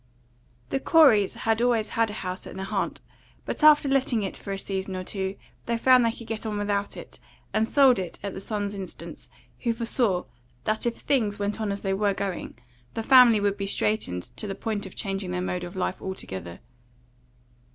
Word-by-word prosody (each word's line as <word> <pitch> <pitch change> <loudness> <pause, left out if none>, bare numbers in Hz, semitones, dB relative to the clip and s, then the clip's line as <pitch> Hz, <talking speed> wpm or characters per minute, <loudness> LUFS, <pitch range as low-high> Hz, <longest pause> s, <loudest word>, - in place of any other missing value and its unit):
THE 270 - +1
Coreys 265 - +5
had 225 0 0
always 235 -3 +2
had 230 -1 +1
a - - -6
house 185 0 -5
at - - -9
Nahant, 190 0 -3 0.4
but - - -3
after 300 -1 +7
letting 265 -5 +2
it 195 - -4
for 200 - -7
a 195 - -2
season 190 -1 -3
or 185 - -4
two 190 0 -3 0.3
they 235 0 +1
found 255 +1 +6
they 230 - +2
could 230 - -10
get 220 -1 -5
on 215 -2 -3
without 205 -1 -1
it, - - -11 0.3
and 220 - +2
sold 265 -5 +5
it 180 -3 -5
at 200 - -4
the - - -6
son's 205 -1 -3
instance, 195 -2 -7 0.3
who 235 -2 0
foresaw 230 -5 0 0.4
that 215 +2 0
if 235 - -1
things 225 -8 0
went 205 +2 -2
on 210 -2 -1
as 200 - -4
they 195 -1 0
were 200 0 +1
going, 195 -2 -4 0.4
the 225 - -2
family 250 -3 +7
would 205 -1 0
be 195 - -3
straitened 95 - 0
to 210 - -3
the 195 - -4
point 210 -3 -3
of 185 - -13
changing 195 -2 -3
their 180 0 -2
mode 180 0 -2
of 175 +2 -7
life 185 0 -2
altogether. 95 - -6
205 Hz, 200 wpm, -26 LUFS, 195-230 Hz, 0.4 s, after